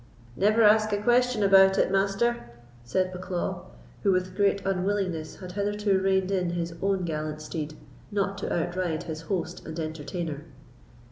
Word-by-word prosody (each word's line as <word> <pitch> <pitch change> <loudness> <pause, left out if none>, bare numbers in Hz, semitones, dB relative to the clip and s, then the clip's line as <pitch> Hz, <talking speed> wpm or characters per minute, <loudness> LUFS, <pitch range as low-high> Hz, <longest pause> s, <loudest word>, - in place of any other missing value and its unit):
"Never 215 - +3
ask 215 0 +5
a - - +2
question 240 +1 +2
about 195 -1 +6
it, - - +2
Master," 195 - +1 0.3
said 185 +10 0
Bucklaw, 180 -1 -4 0.4
who, 195 - +3
with 185 0 0
great 200 -1 +1
unwillingness, 185 -4 -1
had 180 -1 -9
hitherto 205 0 0
reined 190 0 +1
in 180 -3 0
his 170 -1 -3
own 195 -2 +1
gallant 155 -1 -3
steed, 155 0 -5 0.3
not 200 -1 -1
to - - -4
outride 175 -1 -1
his 160 -1 -6
host 180 +1 -3
and 160 +1 -7
entertainer. 155 0 -4
185 Hz, 150 wpm, -27 LUFS, 170-200 Hz, 0.4 s, about